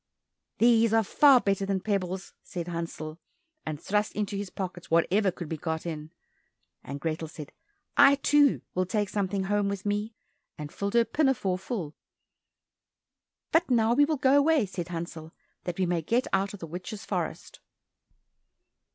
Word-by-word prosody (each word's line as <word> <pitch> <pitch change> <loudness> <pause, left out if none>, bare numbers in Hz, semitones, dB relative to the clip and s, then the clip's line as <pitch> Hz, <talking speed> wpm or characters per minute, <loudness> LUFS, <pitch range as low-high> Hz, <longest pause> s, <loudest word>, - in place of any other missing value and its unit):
"These 230 -1 +4
are 225 - +4
far 275 +5 +6
better 195 -3 0
than 195 -1 0
pebbles!" 190 -2 -3
said 175 -2 -6
Hansel, 165 -2 -5 0.5
and 150 -2 -3
thrust 210 +5 0
into 205 -1 -2
his 200 -1 -4
pockets 180 -3 -6
whatever 190 +5 +3
could 175 -2 -6
be 160 - -4
got 160 +1 -3
in, 155 -2 -5 0.7
and 140 +1 -6
Grethel 160 +2 -3
said, 150 -2 -9 0.4
"I, 280 0 +7
too, 285 0 +3
will 185 0 0
take 205 +1 0
something 195 -1 -1
home 205 +1 +1
with 200 -1 -5
me," 210 +2 -2 0.4
and 150 -1 -7
filled 200 +2 -3
her 235 -1 +5
pinafore 250 -12 +1
full. 190 - -4 1.6
"But 335 -1 +3
now 230 -2 +3
we 290 +4 +5
will 310 0 -1
go 270 0 +4
away." 290 -3 +4
said 180 -3 -5
Hansel, 165 -2 -6 0.3
"that 175 -1 -3
we 190 - +1
may 175 -1 0
get 235 - +1
out 195 +1 +1
of 200 - -14
the - - -4
witch's 180 +5 -7
forest." - - -4
195 Hz, 160 wpm, -28 LUFS, 170-225 Hz, 1.6 s, I